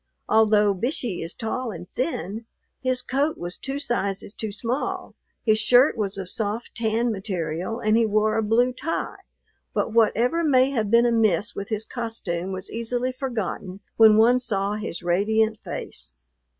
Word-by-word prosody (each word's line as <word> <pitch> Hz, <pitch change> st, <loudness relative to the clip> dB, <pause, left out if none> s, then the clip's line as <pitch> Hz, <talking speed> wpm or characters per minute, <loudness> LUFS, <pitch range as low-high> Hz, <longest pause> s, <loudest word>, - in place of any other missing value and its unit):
Although 215 Hz, -2 st, +4 dB
Bishey 230 Hz, -, -2 dB
is 165 Hz, -, -6 dB
tall 245 Hz, +2 st, -3 dB
and 175 Hz, -3 st, -8 dB
thin, 225 Hz, -, -3 dB, 0.3 s
his 255 Hz, -1 st, 0 dB
coat 280 Hz, +5 st, 0 dB
was 175 Hz, +1 st, -5 dB
two 270 Hz, +1 st, -4 dB
sizes 200 Hz, -8 st, -2 dB
too 220 Hz, -2 st, -5 dB
small, 235 Hz, +6 st, -3 dB, 0.3 s
his 215 Hz, -1 st, +4 dB
shirt 245 Hz, +5 st, +5 dB
was 205 Hz, -3 st, -1 dB
of 190 Hz, -2 st, -5 dB
soft 215 Hz, +4 st, -3 dB
tan 230 Hz, +1 st, 0 dB
material, 185 Hz, 0 st, -3 dB
and 215 Hz, -1 st, +2 dB
he 230 Hz, -1 st, +3 dB
wore 215 Hz, +1 st, +2 dB
a 225 Hz, -, +2 dB
blue 235 Hz, +4 st, +2 dB
tie. 295 Hz, +6 st, -3 dB, 0.6 s
But 220 Hz, -, 0 dB
whatever 235 Hz, +8 st, +3 dB
may 265 Hz, -3 st, +4 dB
have 220 Hz, -6 st, -1 dB
been 235 Hz, +2 st, +5 dB
amiss 225 Hz, -3 st, +2 dB
with 200 Hz, -, -5 dB
his 215 Hz, -1 st, -2 dB
costume 195 Hz, -7 st, -4 dB
was 185 Hz, 0 st, -5 dB
easily 240 Hz, +2 st, -2 dB
forgotten 220 Hz, -7 st, -4 dB, 0.2 s
when 220 Hz, -1 st, +7 dB
one 240 Hz, +3 st, +5 dB
saw 200 Hz, -4 st, -1 dB
his 210 Hz, -5 st, -5 dB
radiant 215 Hz, +5 st, +1 dB
face. 65 Hz, -, -7 dB
220 Hz, 160 wpm, -24 LUFS, 200-245 Hz, 0.6 s, when